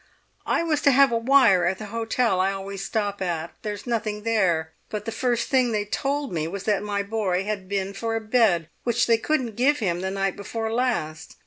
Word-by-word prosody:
"I -, -, +1 dB
was 310 Hz, -3 st, 0 dB
to 285 Hz, -, +5 dB
have 275 Hz, 0 st, +5 dB
a -, -, +1 dB
wire 230 Hz, -8 st, +5 dB
at 185 Hz, +2 st, 0 dB
the 215 Hz, -, -7 dB
hotel 230 Hz, -3 st, +1 dB
I 190 Hz, +1 st, +2 dB
always 195 Hz, 0 st, -6 dB
stop 205 Hz, -1 st, -2 dB
at; 170 Hz, -3 st, -3 dB
there's 210 Hz, -1 st, -5 dB
nothing 220 Hz, -3 st, -2 dB
there; 180 Hz, -8 st, +1 dB, 0.2 s
but 210 Hz, -1 st, -5 dB
the 225 Hz, -, -3 dB
first 240 Hz, 0 st, -1 dB
thing 255 Hz, -3 st, +2 dB
they 210 Hz, -1 st, 0 dB
told 280 Hz, +3 st, -2 dB
me 160 Hz, -2 st, -1 dB
was 195 Hz, +3 st, -5 dB
that 210 Hz, -2 st, +1 dB
my 205 Hz, -1 st, -2 dB
boy 200 Hz, -3 st, -1 dB
had 200 Hz, -2 st, -4 dB
been 195 Hz, -1 st, -2 dB
for 225 Hz, +3 st, -3 dB
a -, -, 0 dB
bed 215 Hz, -7 st, +2 dB, 0.2 s
which 240 Hz, 0 st, +2 dB
they 230 Hz, -1 st, +3 dB
couldn't 255 Hz, -6 st, -1 dB
give 275 Hz, +5 st, +3 dB
him 175 Hz, -8 st, -1 dB
the 190 Hz, -, -2 dB
night 195 Hz, 0 st, -1 dB
before 220 Hz, +2 st, -4 dB
last. 225 Hz, -11 st, -2 dB
210 Hz, 215 wpm, -24 LUFS, 195-235 Hz, 0.2 s, to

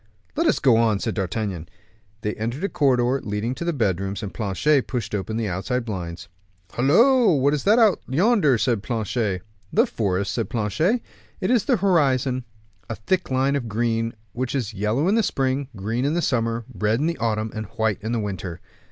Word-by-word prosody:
"Let 330 Hz, +2 st, +1 dB
us -, -, +3 dB
go 130 Hz, -6 st, +4 dB
on," 115 Hz, -3 st, +3 dB
said 110 Hz, +2 st, -2 dB
D'Artagnan. 95 Hz, -3 st, -3 dB, 0.5 s
They 105 Hz, 0 st, -2 dB
entered 120 Hz, -, -4 dB
a 200 Hz, -, 0 dB
corridor 130 Hz, -2 st, +2 dB
leading 105 Hz, +4 st, -2 dB
to 150 Hz, -, -6 dB
the 170 Hz, -, 0 dB
bedrooms, 100 Hz, -, -1 dB
and 100 Hz, -, -5 dB
Planchet 120 Hz, +7 st, +1 dB
pushed 120 Hz, -5 st, -3 dB
open 105 Hz, +2 st, -2 dB
the 115 Hz, -2 st, -1 dB
outside 115 Hz, +7 st, -2 dB
blinds. 90 Hz, -6 st, -5 dB, 0.4 s
"Hollo! 225 Hz, -, +4 dB
what 140 Hz, +1 st, +2 dB
is 150 Hz, -, -1 dB
that 210 Hz, +3 st, +5 dB
out 220 Hz, -5 st, +4 dB
yonder?" 160 Hz, -, +3 dB
said 115 Hz, -3 st, +1 dB
Porthos. 110 Hz, -4 st, -2 dB, 0.3 s
"The 230 Hz, +4 st, +4 dB
forest," 100 Hz, -, -1 dB
said 115 Hz, -, -2 dB
Planchet. 155 Hz, -, 0 dB, 0.4 s
"It -, -, 0 dB
is 240 Hz, -5 st, +3 dB
the -, -, +3 dB
horizon, 135 Hz, -9 st, +2 dB, 0.4 s
a 115 Hz, -, -3 dB
thick 180 Hz, -, -1 dB
line 135 Hz, +2 st, +1 dB
of 120 Hz, -5 st, -3 dB
green, 115 Hz, +1 st, -1 dB, 0.2 s
which 125 Hz, +2 st, -3 dB
is 115 Hz, -5 st, -2 dB
yellow 105 Hz, -, 0 dB
in 195 Hz, -, +3 dB
the 225 Hz, -, +4 dB
spring, 135 Hz, -7 st, -1 dB
green 110 Hz, +5 st, -2 dB
in 145 Hz, +4 st, +1 dB
the 175 Hz, -, +1 dB
summer, 115 Hz, -2 st, 0 dB
red 110 Hz, +2 st, 0 dB
in 150 Hz, -, 0 dB
the 170 Hz, +1 st, -1 dB
autumn, 110 Hz, -1 st, -1 dB
and 110 Hz, -2 st, -5 dB
white 110 Hz, -2 st, +1 dB
in 110 Hz, +2 st, -3 dB
the 120 Hz, -, 0 dB
winter." 95 Hz, -4 st, -4 dB
120 Hz, 195 wpm, -23 LUFS, 105-140 Hz, 0.5 s, that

